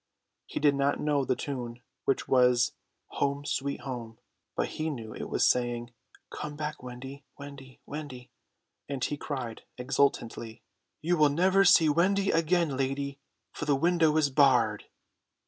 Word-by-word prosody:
He - - -4
did 145 -1 +4
not 140 +1 +1
know 145 -2 +1
the 130 - +1
tune, 120 -4 -5 0.3
which 135 - 0
was 125 -2 +4 0.5
"Home, 140 0 0
Sweet 140 0 -2
Home," 120 -4 -6 0.4
but - - 0
he 155 +1 -3
knew 115 -7 -6
it - - -6
was 120 - +3
saying, 120 -1 0 0.4
"Come 150 -1 -6
back, 150 0 -4
Wendy, 130 +3 -9
Wendy, 140 -2 -11
Wendy"; 130 -5 -8 0.6
and 135 -2 -3
he 145 - -2
cried 130 -6 -5 0.2
exultantly, 125 -3 -1 0.4
"You 175 +2 +2
will 150 -1 +5
never 185 +6 +4
see 165 -3 +6
Wendy 195 +6 +2
again, 165 -2 +2
lady, 140 +1 -2 0.3
for - - -5
the 145 -2 +3
window 160 +1 +3
is 145 -3 +2
barred!" 125 -7 +3
140 Hz, 145 wpm, -29 LUFS, 125-150 Hz, 0.6 s, see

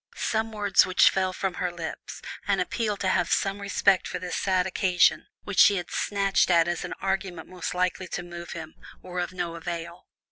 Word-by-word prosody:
Some 225 0 -1
words 205 -2 +4
which 185 0 +5
fell 190 -1 0
from 190 0 -2
her 180 - 0
lips, 170 -2 -7 0.2
an - - +2
appeal 215 -4 -1
to 190 - -2
have 175 -2 +1
some 195 +1 0
respect 200 -1 +2
for - - -4
this 180 0 -4
sad 185 -2 +1
occasion, 185 -1 +2 0.2
which 205 - -2
she 205 - +7
had 175 -2 -4
snatched 195 -2 +1
at 170 -2 +4
as 175 -1 -1
the - - -5
argument 190 -3 -2
most 180 -1 -5
likely 180 +1 0
to 175 - -4
move 175 0 -8
him, 160 -2 -8 0.3
were 180 0 -5
of 175 - -2
no 175 -2 -3
avail. 170 +1 -6
185 Hz, 200 wpm, -26 LUFS, 175-195 Hz, 0.3 s, she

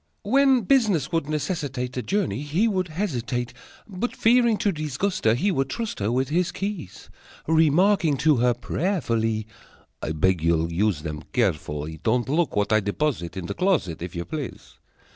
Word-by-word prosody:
When 270 -2 +4
business 205 - +2
would 165 -3 -1
necessitate 145 -5 -3
A 125 - -1
journey, 170 - -1
he 160 +10 +1
would 185 -4 0
hesitate, 125 - -3 0.3
But, 210 +4 -4
fearing 235 -1 +4
to 205 0 +1
disgust 155 - -3
her, 110 +1 +5
He 195 +11 +1
would 135 -6 0
trust 225 - -4
her 105 +2 0
With 130 +2 0
his 175 +3 +1
keys, 195 - -6 0.3
Remarking 160 +1 +3
to 155 -4 +5
her 120 0 +3
prayerfully: 115 - -1 0.6
"I 80 - -2
beg 90 +2 +1
you'll 85 0 +1
use 95 -4 0
them 75 -2 -5
carefully. 75 +1 -1
Don't 120 +2 +1
look 160 +3 +1
what 105 +1 +1
I 110 - +5
deposit 100 - -2
In 90 - -4
that - - -5
closet, 165 - 0
If 90 +1 -6
you 85 0 -3
please." 150 -5 -7
140 Hz, 165 wpm, -24 LUFS, -, 0.6 s, her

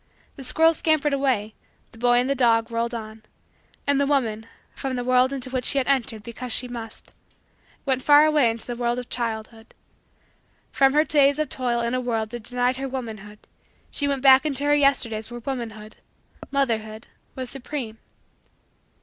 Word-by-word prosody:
The 270 - -9
squirrels 325 +4 +3
scampered 305 -2 +1
away; 255 -6 0 0.4
the 225 - -16
boy 245 0 +3
and 260 +3 +1
dog 230 -2 +2
whirled 235 +1 -2
on; 220 -1 -8 0.6
and 280 0 +2
the 280 - +1
woman, 225 -6 0 0.3
from 270 -2 -4
the 245 - -3
world 255 +1 +3
into 260 -2 -5
which 255 -1 -2
she 280 - +4
had 265 - +2
entered 235 -6 0
because 245 +2 -7
she 250 - -1
must, 230 -2 -9 0.7
went 260 -2 +1
far 295 +2 +6
away 300 -6 +3
into 225 0 -4
the 240 - -5
world 240 0 -1
of 250 -1 -6
childhood. 225 -1 -4 1.0
From 270 -1 +3
her 300 +1 +4
day 290 -3 +4
of 300 +2 -2
toil 240 -2 -1
in 235 +1 -2
a 255 - 0
world 225 -3 -2
that 240 -1 -6
denied 250 +1 0
her 270 0 -4
womanhood 215 -5 -7 0.5
she 285 - 0
went 275 -2 -2
back 265 -1 +7
into 285 -2 -1
her 290 0 +3
Yesterdays 260 -7 +1
where 240 0 -7
womanhood 225 -4 -6 0.5
motherhood 225 -5 -2 0.3
was 255 -2 -2
supreme. 255 -4 -5
250 Hz, 175 wpm, -24 LUFS, 230-275 Hz, 1.0 s, back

